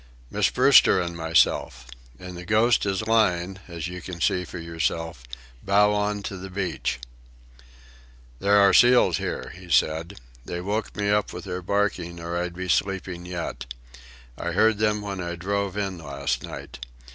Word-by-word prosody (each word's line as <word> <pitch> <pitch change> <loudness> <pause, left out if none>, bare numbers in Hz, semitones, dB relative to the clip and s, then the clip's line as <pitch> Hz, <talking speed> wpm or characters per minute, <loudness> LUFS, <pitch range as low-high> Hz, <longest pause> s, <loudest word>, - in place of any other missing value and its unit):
"Miss - - +2
Brewster - - +6
and 85 -1 -3
myself. 80 -5 +1 0.3
And 90 +3 -9
the 90 - -8
Ghost 110 +2 +3
is 95 +2 -1
lying, 95 -4 +1
as 85 -2 -5
you 90 0 -7
can 90 0 -8
see 90 -1 +1
for 90 - -8
yourself, 85 -2 -3 0.4
bow 105 +1 +3
on 105 0 -1
to 100 - -5
the 95 +1 -8
beach." 90 -8 -3 1.4
"There 100 +1 +4
are 100 -1 +6
seals 125 0 +6
here," - - -4
he 90 -1 -13
said. 80 +4 +1 0.2
"They 85 +7 -5
woke 105 +4 -3
me 100 0 +1
up 105 0 +1
with 90 - -7
their 90 -1 -5
barking, 90 -3 -1
or 85 +1 -5
I'd 85 0 -3
be 90 +1 -5
sleeping 90 -1 -1
yet. 85 -8 -5 0.7
I 85 - -3
heard 110 +2 +3
them 105 -1 +1
when 100 -2 -4
I 85 0 -4
drove 100 +2 -2
in 95 -3 -3
last 70 -3 -3
night. - - -9
90 Hz, 165 wpm, -25 LUFS, 85-100 Hz, 1.4 s, Brewster